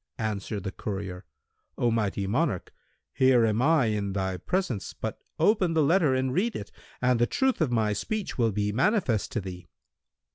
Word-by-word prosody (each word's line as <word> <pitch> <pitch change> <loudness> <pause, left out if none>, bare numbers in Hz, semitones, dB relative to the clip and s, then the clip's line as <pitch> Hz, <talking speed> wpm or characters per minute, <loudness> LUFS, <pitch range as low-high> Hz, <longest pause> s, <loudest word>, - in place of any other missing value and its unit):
Answered 105 -2 -3
the 95 - -3
courier, 95 -4 -5 0.5
"O 120 - +2
mighty 105 -3 0
monarch, 115 - -1 0.4
here 130 -3 +4
am 110 +1 +1
I 155 -1 +4
in 105 -3 -1
thy 95 -1 -1
presence,[FN#178] 155 - -2
but - - -4 0.2
open 190 -6 +3
the 160 - +4
letter 155 -3 +3
and 130 0 0
read 220 - 0
it, 100 - -6 0.3
and 125 -1 +3
the 120 - +3
truth 265 -7 +1
of 150 -6 +2
my 110 -3 +2
speech 215 - -3
will 115 -3 +2
be 105 +1 -1
manifest 135 - +1
to 115 - -1
thee." 90 -2 -8
115 Hz, 175 wpm, -27 LUFS, 100-155 Hz, 0.5 s, here